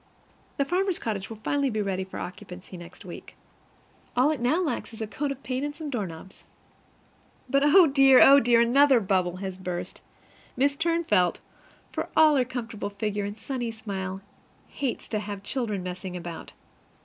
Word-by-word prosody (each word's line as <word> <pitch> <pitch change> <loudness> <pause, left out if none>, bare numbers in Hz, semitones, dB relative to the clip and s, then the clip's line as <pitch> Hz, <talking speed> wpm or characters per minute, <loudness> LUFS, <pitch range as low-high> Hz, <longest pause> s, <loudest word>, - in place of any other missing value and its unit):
The 280 - +1
farmer's 370 +3 0
cottage 200 -4 -4
will 225 - -8
finally 280 -1 +1
be 215 -3 -2
ready 195 -2 -1
for 190 - -9
occupancy 185 0 -8
next 175 +2 -12
week. 175 - -10 0.8
All 265 +5 +4
it 305 - -2
now 250 +8 +2
lacks 300 -7 -3
is 225 - -9
a - - -2
coat 280 +7 -3
of 275 -1 -7
paint 260 +1 -2
and 290 0 -3
some 310 -3 -6
doorknobs. 190 - -6 1.0
But, 275 +2 +2
oh 335 +5 +7
dear! 270 -3 +6
oh 280 +1 +9
dear! 235 -2 +4
another 265 +2 +5
bubble 185 -3 0
has 190 -1 -6
burst! 180 -2 -5 0.6
Mrs 280 +2 +1 0.3
Turnfelt, 180 - +3 0.6
for - - -4
all 310 -1 +7
her 260 -2 +3
comfortable 230 -5 -5
figure 205 0 -3
and 205 +1 -6
sunny 240 +1 -4
smile, 195 -4 -5 0.5
hates 270 -4 -4
to 215 - -1
have 205 -1 -6
children 215 -8 -3
messing 180 0 -6
about. 170 -1 -8
225 Hz, 170 wpm, -26 LUFS, 190-275 Hz, 1.0 s, oh